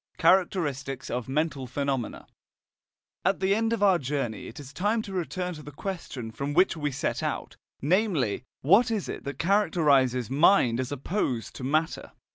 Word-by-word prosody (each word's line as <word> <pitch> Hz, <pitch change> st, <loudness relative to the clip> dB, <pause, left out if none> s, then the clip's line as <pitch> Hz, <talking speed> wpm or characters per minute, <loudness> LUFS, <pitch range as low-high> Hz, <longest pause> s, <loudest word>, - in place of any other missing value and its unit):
CHARACTERISTICS 160 Hz, -7 st, +1 dB
OF 125 Hz, 0 st, -3 dB
MENTAL 140 Hz, -2 st, -1 dB
PHENOMENA 135 Hz, -1 st, -2 dB, 1.0 s
At 190 Hz, +1 st, +2 dB
the 190 Hz, +1 st, +2 dB
end 225 Hz, +2 st, +1 dB
of 225 Hz, -3 st, 0 dB
our 190 Hz, -3 st, +5 dB
journey 135 Hz, -4 st, -3 dB
it 115 Hz, -, -10 dB
is 145 Hz, 0 st, -10 dB
time 215 Hz, +4 st, 0 dB
to 195 Hz, -, -8 dB
return 180 Hz, 0 st, -2 dB
to 150 Hz, -, -9 dB
the 145 Hz, -, -10 dB
question 140 Hz, -, -5 dB
from 140 Hz, +6 st, -4 dB
which 185 Hz, +1 st, +4 dB
we 150 Hz, -2 st, -1 dB
set 140 Hz, 0 st, -2 dB
out, -, -, -3 dB, 0.3 s
namely: 160 Hz, -, +1 dB, 0.2 s
What 200 Hz, -, +5 dB
is 215 Hz, -4 st, -1 dB
it -, -, -6 dB
that 140 Hz, -1 st, -5 dB
characterizes 145 Hz, -, +3 dB
mind 135 Hz, -4 st, +4 dB
as 130 Hz, +1 st, -2 dB
opposed 140 Hz, -, -2 dB
to -, -, -7 dB
matter? 155 Hz, +5 st, -1 dB
150 Hz, 165 wpm, -27 LUFS, 130-190 Hz, 1.0 s, our